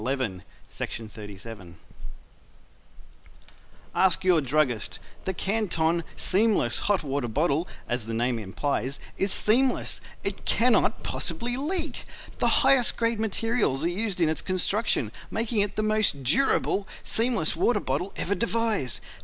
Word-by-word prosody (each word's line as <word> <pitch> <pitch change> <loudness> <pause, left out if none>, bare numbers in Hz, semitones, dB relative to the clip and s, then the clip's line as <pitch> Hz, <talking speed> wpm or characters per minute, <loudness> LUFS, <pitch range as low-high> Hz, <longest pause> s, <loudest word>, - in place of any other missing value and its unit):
CLEMENS, 125 -7 -2 0.4
MICHIGAN 105 -4 -7 2.2
Ask 185 -1 +3
Your 180 -4 +4
Druggist 135 -4 0 0.3
The 190 - -1
Canton 170 -5 0
SEAMLESS 190 - +2
Hot 200 -5 +2
Water 140 -3 -2
Bottle, 150 +7 +1 0.2
as 120 -2 -2
the 115 - -3
name 120 +1 0
implies, 130 +6 -2 0.2
is 195 0 +1
SEAMLESS 250 +7 +2 0.2
it - - -1
cannot 230 -2 +2
possibly 235 +9 -2
leak. 310 0 0 0.3
The - - +2 0.2
highest 265 -3 +4
grade 230 -1 0
materials 220 - 0
are 170 - +2
used 195 +1 -2
in 165 - +4
its 155 - 0
construction, 185 - 0 0.2
making 225 0 -1
it 200 0 0
the 215 - 0
most 215 -10 +1
DURABLE 195 - +2 0.2
seamless 230 -8 +1
water 235 -3 +2
bottle 175 +5 -2
ever 200 - -1
devised. 220 - 0
180 Hz, 125 wpm, -26 LUFS, -, 2.2 s, Your